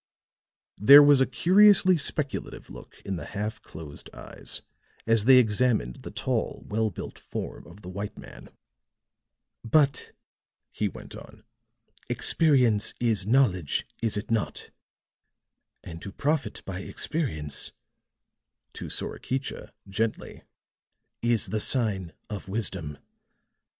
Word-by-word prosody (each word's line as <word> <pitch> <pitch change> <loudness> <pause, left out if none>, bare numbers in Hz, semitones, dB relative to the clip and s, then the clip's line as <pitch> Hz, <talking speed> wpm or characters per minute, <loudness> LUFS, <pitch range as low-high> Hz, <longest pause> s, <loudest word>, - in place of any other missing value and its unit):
There 140 +8 +10
was 145 -2 +6
a 130 - +3
curiously 185 - +5
speculative 150 -2 -3
look - - -13
in 95 -2 -3
the - - -7
half 105 +1 -3
closed 75 -3 -11
eyes - - -9 0.4
as 115 -2 +2
they 130 0 +8
examined 110 - +2
the - - -9
tall, - - -3
well 110 +1 0
built 90 - -8
form - - -7
of 100 +5 -15
the - - -10
white 100 +3 -6
man. - - -12 1.1
"But," 140 +3 +2 0.6
he 105 - -1
went - - -10
on, - - -13 0.7
"experience 125 -10 +2
is 110 -5 +1
knowledge, 105 - +2 0.2
is 110 -3 0
it 105 - -5
not? 115 -2 -2 1.1
And 80 0 -9
to 100 - -7
profit 150 +6 -2
by 95 -1 -5
experience," 80 - -3 1.0
to - - -7
Sorakicha, 130 +1 -4 0.2
gently, 110 +3 -3 0.8
"is 120 -1 +2
the 110 - -1
sign 105 -8 +2 0.2
of 105 -2 -7
wisdom. 95 -8 -2
110 Hz, 115 wpm, -26 LUFS, 95-135 Hz, 1.1 s, There